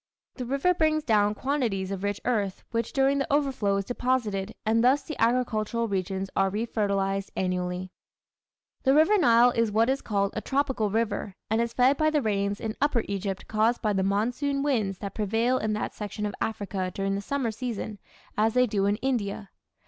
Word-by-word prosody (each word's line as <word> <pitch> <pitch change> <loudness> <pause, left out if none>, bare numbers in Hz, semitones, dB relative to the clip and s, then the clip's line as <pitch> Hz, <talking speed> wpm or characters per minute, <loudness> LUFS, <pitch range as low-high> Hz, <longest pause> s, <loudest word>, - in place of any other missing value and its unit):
The 250 - -5
river 275 +8 +2
brings 310 -2 +1
down 210 -4 +2
quantities 225 -8 -1
of 195 -1 -4
rich 205 0 -1
earth 205 -6 -1
which 230 0 -1
during 275 +1 +2
the 275 - -2
overflow 270 -9 +1
is 195 - -2
deposited, 225 -5 -1
and 225 +1 +3
thus 265 +3 +4
the 310 - -6
agricultural 230 -1 +1
regions 190 -1 -2
are 195 0 +3
refertilized 200 -2 -1
annually. 180 0 -2 0.9
The 270 +1 +3
River 320 +7 +5
Nile 240 -5 +6
is 230 -2 +1
what 225 +4 +3
is 275 - -1
called 200 -2 -1
a 215 - -2
tropical 265 -6 0
river 210 -2 -1 0.2
and 220 +1 +3
is 235 0 -2
fed 260 +3 +4
by 310 0 +3
the 300 -3 +1
rains 200 -1 0
in 220 -1 -4
upper 280 -5 +2
Egypt 195 -1 -3
caused 220 +3 +1
by 210 -1 +2
the 195 - +1
monsoon 245 +9 0
winds 220 -10 0
that 200 0 -6
prevail 225 +4 +1
in 215 0 -1
that 210 - -3
section 210 0 -5
of 205 - -3
Africa 200 -4 -2
during 195 +1 -2
the 200 - -2
summer 265 0 -1
season, 220 -3 -5 0.4
as 220 +2 +1
they 250 0 +5
do 200 -4 0
in 205 - +2
India. 210 -6 -2
220 Hz, 185 wpm, -27 LUFS, 200-255 Hz, 0.9 s, Nile